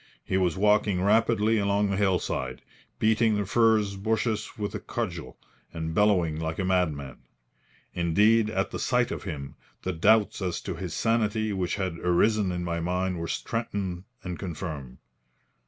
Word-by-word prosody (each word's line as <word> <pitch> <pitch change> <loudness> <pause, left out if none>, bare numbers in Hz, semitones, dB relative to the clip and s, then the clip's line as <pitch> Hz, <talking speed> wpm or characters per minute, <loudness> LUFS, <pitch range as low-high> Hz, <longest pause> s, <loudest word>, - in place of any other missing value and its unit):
He - - -2
was 90 -3 +1
walking 105 -1 +3
rapidly 110 +1 +3
along 100 0 +1
the - - 0
hillside, 90 -10 -1 0.3
beating 110 0 +3
the 105 -1 -1
furze 110 -1 +3
bushes 110 +2 -1
with 105 -1 -3
a - - -3
cudgel 90 -8 -5 0.3
and 80 -1 -4
bellowing 90 -6 +2
like 80 0 -3
a 95 - -1
madman. 80 -8 -1 0.7
Indeed, 105 +6 +3
at 95 -3 -1
the - - -4
sight 125 -1 +1
of - - -5
him, 70 -3 -5 0.3
the 95 - -1
doubts 105 +6 +3
as 90 -2 -2
to - - -4
his - - -5
sanity 110 -2 +1
which 90 -2 -1
had 95 -4 -3
arisen 95 +3 +2
in 90 0 -3
my 85 -1 -2
mind 90 +1 -1
were 85 - -3
strengthened 100 -6 -3 0.2
and 90 -2 -5
confirmed. 75 -8 -6
95 Hz, 155 wpm, -27 LUFS, 85-110 Hz, 0.7 s, walking